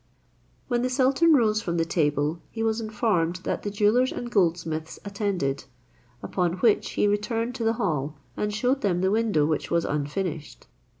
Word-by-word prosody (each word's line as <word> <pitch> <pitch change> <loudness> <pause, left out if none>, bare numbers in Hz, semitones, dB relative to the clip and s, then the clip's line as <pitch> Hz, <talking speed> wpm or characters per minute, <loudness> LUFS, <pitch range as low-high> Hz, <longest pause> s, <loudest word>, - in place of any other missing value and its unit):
When 240 -2 0
the 255 - 0
sultan 270 +5 +3
rose 215 -4 +2
from 170 -4 -2
table, 155 -1 0
he 225 - -4
was 225 0 0
informed 210 -6 0
that - - -2
the 205 - -3
jewellers 210 +5 +2
and 240 0 -5
goldsmiths 165 -5 0
attended; 195 -10 -2 0.6
upon 180 -2 0
which 205 +4 +2
he - - +2
returned 225 +4 -1
to 230 - -3
the 225 0 +2
hall, 155 - -2 0.2
and 210 - -1
showed 250 +6 0
them 180 -3 +1
the 190 +1 +2
window 215 -9 +2
which 155 -1 -1
was 170 -1 +1
unfinished. 150 +2 -3
200 Hz, 165 wpm, -26 LUFS, 165-225 Hz, 0.6 s, sultan